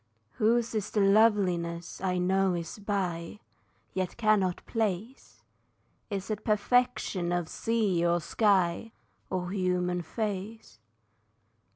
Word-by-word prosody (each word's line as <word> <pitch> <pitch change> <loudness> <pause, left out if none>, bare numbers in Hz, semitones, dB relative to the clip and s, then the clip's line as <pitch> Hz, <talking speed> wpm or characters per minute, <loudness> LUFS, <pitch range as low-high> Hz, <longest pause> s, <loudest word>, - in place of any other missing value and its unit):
Whose 230 +2 +2
is 215 -2 -2
the 215 - -1
loveliness 195 -5 +2
I 180 -1 0
know 190 +1 +2
is 170 +4 -5
by, 195 -3 -3 0.5
Yet 185 -1 -3
cannot 210 -5 +2
place? 220 +2 -3 0.7
Is 200 0 -4
it 215 - -3
perfection 210 -5 +1
of 175 -1 0
the - - -14
sea 215 -7 0
or 170 0 +2
sky, 195 +3 +1 0.4
Or 180 -1 -2
human 180 -2 0
face? 205 - -5
195 Hz, 110 wpm, -29 LUFS, 180-215 Hz, 0.7 s, Whose